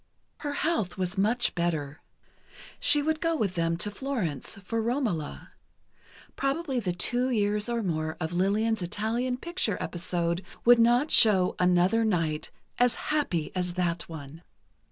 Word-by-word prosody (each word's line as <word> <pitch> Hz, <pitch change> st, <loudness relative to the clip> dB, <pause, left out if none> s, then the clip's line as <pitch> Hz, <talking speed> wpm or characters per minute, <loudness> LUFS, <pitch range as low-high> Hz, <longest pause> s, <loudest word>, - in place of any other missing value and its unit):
Her 290 Hz, -2 st, -4 dB
health 285 Hz, -, -1 dB
was 185 Hz, +1 st, -2 dB
much 220 Hz, +5 st, +2 dB
better. 160 Hz, -4 st, -2 dB, 0.8 s
She 295 Hz, -1 st, +4 dB
would 315 Hz, +1 st, -1 dB
go 330 Hz, -1 st, +1 dB
with 210 Hz, -, -1 dB
them 165 Hz, -1 st, 0 dB
to 205 Hz, +4 st, -2 dB
Florence, 205 Hz, -, -3 dB
for 225 Hz, +4 st, -2 dB
"Romola." 225 Hz, -, -2 dB, 0.8 s
Probably 275 Hz, -1 st, -1 dB
the 190 Hz, -6 st, -2 dB
two 245 Hz, +8 st, 0 dB
years 210 Hz, -2 st, 0 dB
or 235 Hz, -1 st, -1 dB
more 160 Hz, -3 st, -2 dB
of 160 Hz, 0 st, -3 dB
Lillian's 210 Hz, +4 st, +1 dB
Italian 225 Hz, +8 st, -2 dB
picture 340 Hz, -, -1 dB
episode 170 Hz, 0 st, -1 dB, 0.2 s
would 240 Hz, 0 st, +7 dB
not 240 Hz, +6 st, +3 dB
show 195 Hz, -5 st, +5 dB
another 180 Hz, +5 st, +3 dB
night 165 Hz, -8 st, -1 dB, 0.3 s
as 245 Hz, -1 st, +3 dB, 0.2 s
happy 180 Hz, -, -1 dB
as 180 Hz, -1 st, -1 dB
that 175 Hz, -2 st, -1 dB
one. 155 Hz, 0 st, -9 dB
205 Hz, 140 wpm, -27 LUFS, 175-245 Hz, 0.8 s, would